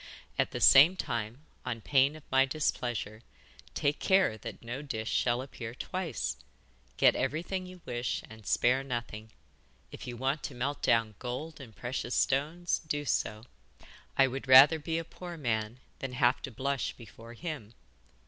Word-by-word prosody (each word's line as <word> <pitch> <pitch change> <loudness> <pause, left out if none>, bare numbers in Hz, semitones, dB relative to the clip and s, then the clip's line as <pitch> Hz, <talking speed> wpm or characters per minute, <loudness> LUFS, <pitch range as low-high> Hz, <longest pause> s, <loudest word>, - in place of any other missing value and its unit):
At - - +2
the - - -5
same 155 +8 +8
time, 115 - -4 0.2
on 120 -2 -3
pain 140 +5 +3
of 155 - -12
my 135 0 +5
displeasure, 120 -6 -2 0.5
take 145 +1 0
care 190 - +3
that 110 - -9
no 120 +4 -5
dish 110 -6 -4
shall 120 +1 +1
appear 120 -3 -8
twice. 170 - -3 0.6
Get - - +5
everything 170 +7 -2
you 180 -1 -12
wish 120 0 -2
and 110 -3 -13
spare 125 +6 +3
nothing. 120 -4 -5 0.6
If - - -9
you 120 -1 -6
want 135 +4 -1
to 140 - -6
melt 140 +4 -2
down 115 -2 +2
gold 140 +6 -5
and 115 -5 -12
precious 120 0 -3
stones, 155 +6 +1
do 145 -1 -2
so. 110 -4 -1 0.7
I 135 - +7
would 135 +1 -4
rather 135 +5 +9
be 160 +2 -2
a 165 - -2
poor 175 +1 -9
man 115 -4 -2 0.2
than 135 -2 -5
have 125 0 +2
to 135 - -6
blush 135 +3 -2
before 115 +1 -13
him. 125 -7 -6
130 Hz, 160 wpm, -30 LUFS, 120-145 Hz, 0.7 s, rather